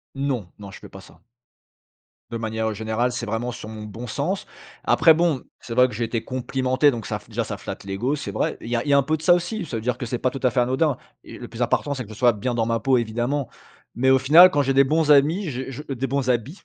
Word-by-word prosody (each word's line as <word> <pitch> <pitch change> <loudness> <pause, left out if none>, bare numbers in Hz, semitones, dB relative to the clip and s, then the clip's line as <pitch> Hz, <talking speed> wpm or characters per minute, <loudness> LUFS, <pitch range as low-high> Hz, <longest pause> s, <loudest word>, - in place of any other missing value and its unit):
Non. 130 -9 -2
Non, 100 -1 -9
je - - -11
fais - - -12
pas 95 - -11
ça. - - -18 1.1
De 115 - -4
manière, 110 0 -2
heu, 110 - -3
générale, 110 +3 -1
c'est 120 -1 -4
vraiment 115 +3 -3
sur 110 0 -9
mon 110 -1 -8
bon 115 +4 -8
sens. 160 - -3 0.4
Après, 160 -2 +5
bon, 165 -5 +1 0.2
c'est 115 - -9
vrai 125 +1 +5
que 120 - -9
j'ai 115 +3 -2
été 115 0 -2
complimenté, 130 +2 +1
donc 115 -5 -6
ça - - -3
f - - -21
déjà - - -1
ça - - -5
flatte - - -8
l'égo, 110 +9 -2
c'est 140 - -6
vrai. - - -2
Il - - -8
y 120 - 0
a 115 - -2
il - - -6
y - - +4
a 140 - +6
un - - +4
peu 155 +4 0
de 155 - -12
ça 175 - +5
aussi. 180 +3 0
Ça 135 - -5
veut 110 - -3
dire 125 +1 -1
que 125 - -5
c'est 120 0 -3
pas 130 - +1
tout 135 - -7
à 125 - +3
fait 125 - +1
anodin. 130 +3 +1 0.3
Et - - -11
le 120 - -8
plus 115 +1 -5
important, 140 +4 0
c'est 130 -2 -5
que 105 - -15
je 110 - -8
sois 120 0 +3
bien 120 +4 -3
dans 115 -1 0
ma 115 -1 0
peau, 130 +2 +3
évidemment. 120 +4 -2 0.5
Mais 130 +2 +2
au 130 - +6
final, 160 +8 +8
quand 145 - +1
j'ai 135 -1 +1
des 135 0 +6
bons 155 +2 +1
amis, 155 +6 +4
j'ai 130 0 -5
je, 135 - -7
heu - - -1
des 135 +3 -2
bons 135 0 -1
habits, 125 - -1
125 Hz, 290 wpm, -23 LUFS, 115-140 Hz, 1.1 s, final